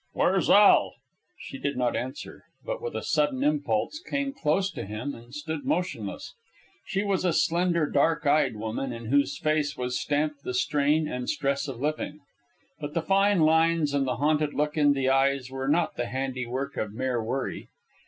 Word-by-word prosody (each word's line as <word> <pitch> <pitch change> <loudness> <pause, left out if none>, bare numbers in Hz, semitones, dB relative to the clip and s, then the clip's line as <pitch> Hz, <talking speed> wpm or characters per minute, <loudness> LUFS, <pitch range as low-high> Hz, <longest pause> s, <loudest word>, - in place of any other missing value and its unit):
"Where's - - +2
Al?" - - +6 0.4
She 135 - -9
did 140 -2 -2
not 125 -1 +1
answer, 130 +3 -6 0.2
but - - -4
with 475 0 -5
a - - -3
sudden 150 -4 +1
impulse 145 - 0
came 280 -5 -3
close 190 - 0
to - - -6
him 105 +8 -5
and 120 +1 -13
stood 150 +2 -5
motionless. 180 +1 -3 0.5
She 195 -1 -1
was 200 -2 0
a 180 - +2
slender, 170 -1 +2
dark 160 +3 +1
eyed 145 -4 +3
woman, 110 +5 -3
in 115 0 -6
whose 140 0 +2
face 155 -2 0
was 125 0 -2
stamped 150 0 -1
the 125 -2 -4
strain 150 +4 +2
and 125 -4 -4
stress 140 0 -1
of 130 -4 -6
living. 150 +1 -2 0.6
But 150 0 -6
the 165 - 0
fine 195 +1 +3
lines 160 -1 +3
and 140 -2 +1
the 125 - 0
haunted 150 +3 +1
look 150 0 0
in 145 -2 +4
the 135 -2 -1
eyes 135 -1 +2
were 135 0 -4
not 160 +3 +1
the 120 - -2
handiwork 130 +1 -3
of 105 -1 -3
mere 125 0 -1
worry. 130 +4 -3
145 Hz, 180 wpm, -27 LUFS, 130-160 Hz, 0.6 s, Al